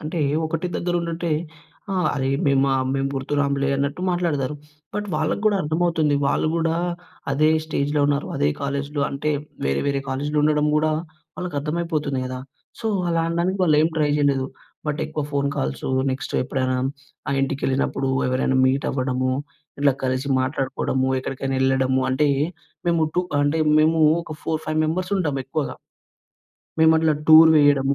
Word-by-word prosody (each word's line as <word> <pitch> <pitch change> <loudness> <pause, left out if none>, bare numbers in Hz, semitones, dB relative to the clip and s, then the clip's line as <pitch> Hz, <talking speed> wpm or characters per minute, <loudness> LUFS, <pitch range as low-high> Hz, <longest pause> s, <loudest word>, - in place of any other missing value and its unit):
అంటే 160 +2 -3 0.3
ఒకటే 165 +3 -2
దగ్గర 175 0 -2
ఉండుంటే 170 0 -3 0.6
ఆహ్, 185 -2 +1
అరే 135 -1 -1 0.2
మేం 135 -1 +4
ఆహ్, 130 0 +1
మేము 135 0 0
గుర్తు 135 +2 -3
రాములే 140 0 +1
అన్నట్టు 140 +4 -2
మాట్లాడతారు. 150 -6 -1 0.4
బట్ 210 0 -2
వాళ్ళకి 155 +6 -1
కూడా 210 -1 +4
అర్థమవుతుంది 160 -1 +1
వాళ్ళు 140 - +1
కూడా 165 0 +1 0.6
అదే 155 +3 +3 0.2
స్టేజ్‌‌లో 145 -1 0
ఉన్నారు. 145 0 0
అదే 70 - +2
కాలేజ్‌లో 140 +1 -2
అంటే 145 +2 -2 0.4
వేరే, 70 0 0
వేరే 140 -1 0
కాలేజ్‌లో 145 +3 -1
ఉండడం 150 0 +3
కూడా, 155 +1 +2 0.5
వాళ్ళకి 180 -4 -4
అర్థమైపోతుంది 150 -3 -2
కదా! 130 0 -5 0.4
సో 225 - -3 0.2
అలా 165 -1 +1
అనడానికి 170 +3 0
వాళ్ళు 155 -4 +4
ఏమి 160 +2 +2
ట్రై 150 -2 +2
చేయలేదు. 140 -2 +1 0.4
బట్ 150 +1 -1
ఎక్కువ 155 -1 -3
ఫోన్ 140 -1 0
కాల్సు, 65 0 -2 0.2
నెక్స్ట్ 135 +2 -4
ఎప్పుడైనా 130 0 -1 0.5
ఆ - - 0
ఇంటికెళ్ళినప్పుడు 135 0 -1 0.2
ఎవరైనా 130 +1 +1
మీట్ 135 +1 +1
అవ్వడము. 130 -1 -1 0.5
ఇట్ల 140 0 +4
కలిసి 130 +2 -1
మాట్లాడుకోవడము, 130 0 -1
ఎక్కడికైనా 135 +1 -3
ఎళ్ళడము, 130 0 +2
అంటే, 145 +3 +2 0.6
మేము 170 -1 +2
2 180 - +2 0.2
అంటే 145 +3 +1 0.2
మేము 160 +1 +3 0.2
ఒక 155 -2 -8
ఫోర్ 160 -1 -1
ఫైవ్ 155 0 -1
మెంబర్స్ 180 +5 -2
ఉంటాము 150 -7 -1
ఎక్కువగా. 145 +2 -3 1.0
మేమట్లా 160 0 +5 0.2
టూర్ 160 +1 +9
వేయడము. 140 -2 +4
145 Hz, 150 wpm, -22 LUFS, 135-160 Hz, 1.0 s, టూర్